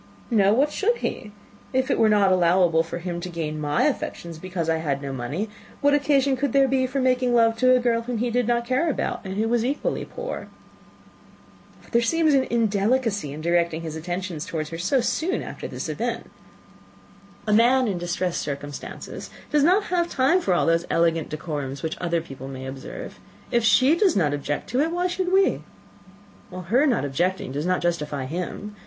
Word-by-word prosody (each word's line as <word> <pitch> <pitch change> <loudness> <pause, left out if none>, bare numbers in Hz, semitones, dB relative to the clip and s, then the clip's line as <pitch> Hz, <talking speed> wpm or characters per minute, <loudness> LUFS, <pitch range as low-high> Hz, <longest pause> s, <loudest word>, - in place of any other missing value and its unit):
"No 200 -3 +4
why 270 +4 +4
should 410 +10 0
he? 210 - -4 0.4
If 260 0 +1
it - - +1
were 220 - +5
not 205 -2 +4
allowable 175 -2 +4
for 165 +1 -5
him 175 0 -4
to 180 - -5
gain 155 -3 -4
my 145 0 +1
affections, 170 - -2
because 180 -2 -4
I 165 0 +2
had 145 -4 -1
no 140 -1 -5
money, 140 - -3 0.3
what 285 0 +3
occasion 280 -2 +3
could 275 -1 -1
there 275 -1 +5
be 260 0 +1
for 265 +2 -2
making 255 -1 +2
love 230 -1 +4
to 255 +2 +5
a - - +3
girl 235 -1 +1
whom 240 0 -4
he 240 +2 -1
did 245 -1 +1
not 235 0 +1
care 255 +7 +1
about, 290 - -2
and 190 -1 -5
who 220 +1 +1
was 235 0 +1
equally 275 +4 -1
poor?" - - -6 1.4
"But - - -20
there 235 - +3
seems 315 +5 +2
indelicacy 225 - +1
in 150 +2 -7
directing 170 -1 +1
his 160 -1 -5
attentions 175 0 -4
towards 155 -1 -4
her 165 - -5
so 250 +9 +2
soon 330 +9 -1
after - - -7
this - - -5
event." - - -3 1.1
"A 210 - +1
man 245 +3 +4
in 190 -4 -2
distressed 175 0 -2
circumstances 145 0 -6 0.2
has 300 - +3
not 365 +7 +4 0.3
time 280 +7 +3
for 185 - +1
all - - +2
those 165 +1 +1
elegant 165 -1 +1
decorums 145 -3 -5
which 160 - -2
other 170 -2 0
people 135 -4 -9
may 130 -1 -7
observe. 130 0 -8 0.3
If 235 -1 +2
she 260 +6 +5
does 375 0 +3
not 155 -7 +2
object 145 0 -3
to 250 - +1
it, 310 +3 +2
why 350 +1 -1
should 365 0 -1
we?" 385 +1 +3 0.9
"Her 185 - +1
not 240 - +1
objecting 175 +2 -1
does 145 +5 -2
not 185 0 +1
justify 150 -5 -1
him. 180 +7 -5
200 Hz, 190 wpm, -24 LUFS, 165-255 Hz, 1.4 s, were